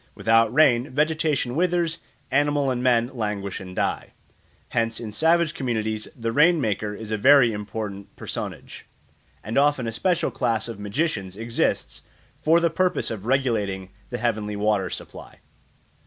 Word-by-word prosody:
Without 115 0 +3
rain 130 -2 +4
vegetation 150 -3 0
withers, 170 -1 +1 0.3
animals 145 0 +2
and 125 -1 -2
men 120 -1 +2
languish 105 -5 -3
and 90 -1 -9
die. - - -2 0.6
Hence 115 0 -1
in 110 -3 -6
savage 165 +6 +2
communities 110 -4 -2
the 115 -1 -3
rain 160 +7 +4
maker 105 -4 -1
is 110 +1 -8
a 110 - 0
very 135 -1 +6
important 105 -1 -6
personage; - - -6 0.6
and 110 +6 0
often 145 -3 +2
a 115 - -2
special 170 +8 0
class 115 -1 -1
of 115 -3 -7
magicians 105 - -2
exists 115 +1 -1 0.4
for 165 +2 +4
the 170 -1 +1
purpose 185 +2 0
of 110 -1 -6
regulating 105 -8 0 0.2
the 125 - -3
heavenly 110 -3 -1
water 100 -2 +1
supply. - - -9
115 Hz, 145 wpm, -24 LUFS, 105-145 Hz, 0.6 s, very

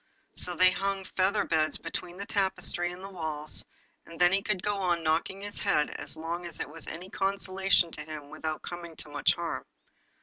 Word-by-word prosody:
So 180 - +4
they 185 +1 +7
hung 195 0 -1
feather 190 +3 +2
beds 155 -1 +3
between 180 0 -5
the 200 - -4
tapestry 190 -3 +1
and 180 +1 -9
the 195 - -6
walls, 155 -4 -2 0.4
and 165 - -12
then 175 0 +6
he 195 +1 +3
could 195 -2 -1
go 205 -1 +1
on 175 -3 +1
knocking 165 +5 +1
his 205 0 -3
head 150 -1 +3
as - - -5
long 170 +2 -3
as 170 - -4
it - - -2
was 165 +1 -4
any 180 +4 -7
consolation 195 -2 +2
to 150 - -5
him 150 -1 -8
without 155 0 -4
coming 170 -2 -7
to 155 - -7
much 145 +4 +3
harm. 170 -1 -3
175 Hz, 200 wpm, -29 LUFS, 160-190 Hz, 0.4 s, they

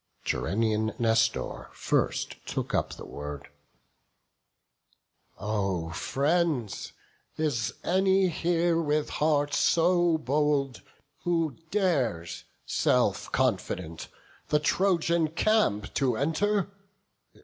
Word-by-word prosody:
Gerenian 110 +1 0
Nestor 115 -1 0
first - - -1
took - - -3
up - - 0
the - - -10
word: 75 -1 -7 1.9
"O 100 -6 -2
friends! 140 - -1 0.4
is 145 -8 -1
any 190 +1 +3
here 170 0 +1
with 150 -1 0
heart 145 -1 +1
so 175 0 +3
bold 145 -2 0 0.4
Who 165 -5 0
dares, 135 - 0 0.2
self - - +1
confident, 80 -2 -1 0.4
the 150 - +3
Trojan 170 0 +2
camp 165 - +1
To 125 -5 +1
enter? 195 - 0
150 Hz, 85 wpm, -28 LUFS, 115-170 Hz, 1.9 s, any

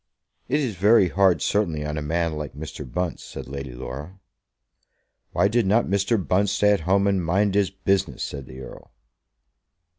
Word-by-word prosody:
"It 145 +4 +1
is 120 -10 -2
very 100 0 +5
hard 95 -2 +3
certainly 85 -8 0
on 75 0 -3
a 75 - -3
man 85 +2 -1
like 75 -3 -6
Mr. 75 -3 -8
Bunce," 90 +5 -3
said - - -8
Lady 70 -2 -6
Laura. 70 +9 -8 1.1
"Why - - +3
did 110 0 +1
not 110 +5 +3
Mr. 100 +4 +1
Bunce 95 +2 +2
stay 105 0 +3
at 100 - +3
home 100 +1 +4
and 100 -2 +1
mind 95 +4 +1
his 100 -1 +2
business?" 95 0 -1
said 70 -3 -6
the 65 +1 -10
Earl. 65 - -11
95 Hz, 175 wpm, -24 LUFS, 75-100 Hz, 1.1 s, very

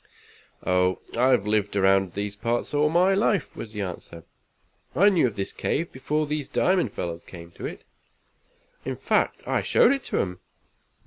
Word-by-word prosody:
"Oh, 90 0 +2 0.2
I've 125 -3 +3
lived 105 -1 0
around 95 -2 +3
these 100 0 -3
parts 115 +6 -2
all 150 +1 +3
my 180 +4 +4
life," 195 -4 +1
was 110 - -7
the 105 -1 -4
answer. 85 -3 -7 0.7
"I 200 +3 +6
knew 175 -9 +3
of 110 - -6
this 95 - -3
cave 165 +3 -2
before 150 +4 -1
these 150 -1 -3
diamond 180 - +2
fellers 85 -1 -4
came 85 -2 -11
to - - -6
it. - - -9 1.0
In - - -3
fact, - - 0
I - - +1
showed - - +4
it 275 -1 -1
to - - -2
'em. 90 -1 -2
110 Hz, 170 wpm, -25 LUFS, 95-150 Hz, 1.0 s, I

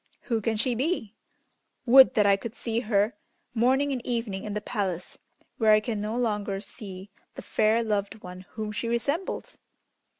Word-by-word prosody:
Who 230 -3 -1
can 220 +1 0
she 245 +3 +1
be? 245 - -1 0.7
Would 260 +2 +8
that 210 -3 +4
I 200 -1 +6
could 225 +4 -7
see 230 -4 -1
her 210 -1 +1 0.4
morning 260 +5 +2
and 255 -3 -3
evening 230 -5 -3
in 210 -1 -4
the - - 0
palace, 195 -5 -3 0.4
where 220 -2 +6
I 215 - +6
can 215 -1 -3
no 215 +3 -2
longer 210 -4 -1
see 195 -1 -8 0.2
the - - -8
fair 220 +2 +2
loved 210 -1 -2
one 180 +1 -9
whom 215 -1 -4
she 220 +2 -3
resembles!" 285 - -2
220 Hz, 170 wpm, -27 LUFS, 205-240 Hz, 0.7 s, Would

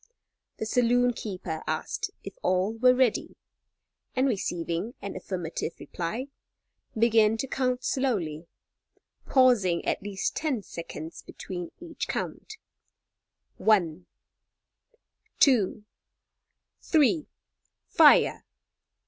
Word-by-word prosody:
The - - -3
saloon 245 +2 +3
keeper 185 -8 -5
asked 160 - -2
if - - -7
all 185 +4 +1
were 250 +2 +4
ready, 255 -3 +1 0.8
and 260 +1 +2
receiving 180 -1 -2
an 200 0 -6
affirmative 180 -3 -4
reply, 220 +11 -4 0.7
began 225 -1 +4
to 270 - -3
count 255 -1 -1
slowly, 175 - -1 0.8
pausing 230 -10 +3
at - - 0
least 200 -1 -3
ten 275 -9 -1
seconds 165 -2 -8
between 175 -2 -7
each 335 -2 -6
count: 435 - -5 1.0
"one, 180 -6 +2 1.3
two, 220 -6 +3 1.0
three 310 -1 +2 0.6
fire!" - - +5
220 Hz, 90 wpm, -27 LUFS, 180-255 Hz, 1.3 s, fire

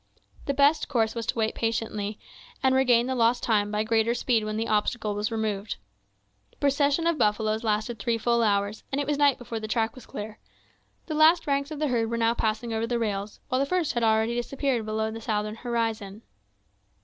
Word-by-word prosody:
The 280 - 0
best 285 +3 +3
course 225 -5 +1
was 230 -2 -5
to - - 0
wait 220 -1 0
patiently, 215 -2 -2 0.5
and 265 0 +4
regain 245 -3 +4
the 260 - -1
lost 240 0 +2
time 210 -3 +2
by 210 0 0
greater 225 +1 +1
speed 235 -3 +1
when 215 0 -3
the 225 +1 -1
obstacle 215 0 0
was 210 +2 -2
removed. 215 -2 -2 0.7
The - - -31
procession 285 +3 +2
of 335 -2 +1
buffaloes 215 +1 +1
lasted 215 +1 -1
three 230 +3 0
full 235 +1 +1
hours, 205 -1 0
and 275 - 0
it 285 - 0
was 290 0 -1
night 285 -2 +4
before 230 -2 -5
the 215 - -5
track 225 +1 0
was 255 - -13
clear. 210 +1 -7 0.7
The 315 - -4
last 315 +2 +5
ranks 280 0 0
of 310 - -6
the 300 -1 0
herd 230 -2 0
were 235 - -2
now 230 0 +2
passing 225 +1 -1
over 225 +1 -1
the 240 0 0
rails, 205 -2 -3
while 255 - +1
the 275 - +1
first 345 -2 0
had 240 - -1
already 220 +1 +2
disappeared 240 -1 -1
below 220 0 -1
the 225 +1 -7
southern 215 0 -2
horizon. 225 -3 -3
230 Hz, 210 wpm, -26 LUFS, 215-255 Hz, 0.7 s, last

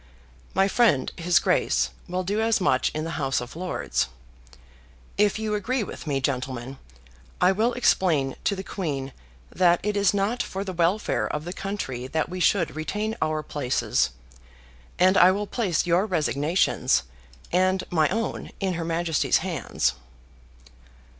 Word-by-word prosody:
My 195 - +4
friend, 205 - +3
his 170 0 +2
Grace, - - +2 0.2
will 180 +1 -2
do 205 +4 -1
as 225 0 +2
much 130 -8 +2
in 155 - -2
the 165 +1 -4
House 135 -3 +1
of 125 +2 -8
Lords. 180 - -1 1.1
If 205 0 +2
you 215 -1 -2
agree 220 +4 0
with 170 - -8
me, 140 -2 0
gentlemen, 130 -1 -3 0.6
I 180 +1 +5
will 225 +5 +1
explain 160 - +2
to 200 - +2
the 190 - -5
Queen 140 -10 -4 0.4
that 175 -1 +3
it 210 +1 -1
is 200 -2 +3
not 205 +5 0
for 195 +1 -4
the 190 -2 -5
welfare 175 +5 +1
of 150 +1 -4
the 175 - -5
country 190 -12 -4
that 160 +3 -1
we 185 +1 -5
should 175 -3 +2
retain 210 +8 -2
our 155 0 0
places, 130 - 0 0.9
and 185 +2 +4
I 180 - +8
will 205 +2 -1
place 200 -7 0
your 175 +4 +2
resignations 155 - +1 0.5
and 185 +1 +2
my 155 -3 +3
own 225 +4 -3
in 190 -2 0
her 170 -1 -3
Majesty's 165 -2 +1
hands." 65 - -1
180 Hz, 155 wpm, -25 LUFS, 150-200 Hz, 1.1 s, I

